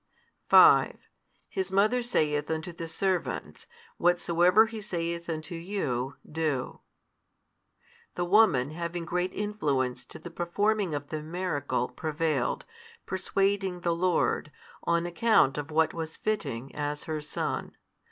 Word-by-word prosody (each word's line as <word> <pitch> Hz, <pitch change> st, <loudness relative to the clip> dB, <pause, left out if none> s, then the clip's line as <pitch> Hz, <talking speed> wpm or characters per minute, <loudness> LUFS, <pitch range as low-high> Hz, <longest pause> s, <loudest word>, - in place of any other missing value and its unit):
5 -, -, +7 dB, 0.5 s
His 190 Hz, -2 st, -3 dB
mother 215 Hz, +6 st, +3 dB
saith 150 Hz, -11 st, 0 dB
unto 160 Hz, +2 st, -3 dB
the 165 Hz, 0 st, -6 dB
servants, 185 Hz, +2 st, -2 dB, 0.3 s
Whatsoever 175 Hz, +4 st, +4 dB
He 220 Hz, -1 st, -7 dB
saith 170 Hz, -3 st, -3 dB
unto 155 Hz, +1 st, -4 dB
you, 165 Hz, -8 st, -3 dB
do. 150 Hz, -5 st, -2 dB, 1.4 s
The 175 Hz, -, -1 dB
woman 175 Hz, -, +4 dB
having 170 Hz, +1 st, -4 dB
great 180 Hz, +2 st, -1 dB
influence 145 Hz, -13 st, -1 dB
to -, -, -11 dB
the 175 Hz, -, -10 dB
performing 190 Hz, +1 st, 0 dB
of 145 Hz, 0 st, -5 dB
the 155 Hz, -1 st, -3 dB
miracle, 155 Hz, -6 st, -2 dB
prevailed, 155 Hz, 0 st, -1 dB, 0.4 s
persuading 190 Hz, -1 st, 0 dB
the 170 Hz, 0 st, +1 dB
Lord, 170 Hz, -3 st, +1 dB, 0.3 s
on 170 Hz, 0 st, +2 dB
account 175 Hz, -, +3 dB
of 145 Hz, -, -5 dB
what 160 Hz, +1 st, +2 dB
was 160 Hz, -1 st, -5 dB
fitting, 140 Hz, -, -3 dB
as 150 Hz, 0 st, -3 dB
her 155 Hz, -2 st, -3 dB
Son. 150 Hz, -, -4 dB
170 Hz, 125 wpm, -28 LUFS, 150-190 Hz, 1.4 s, 5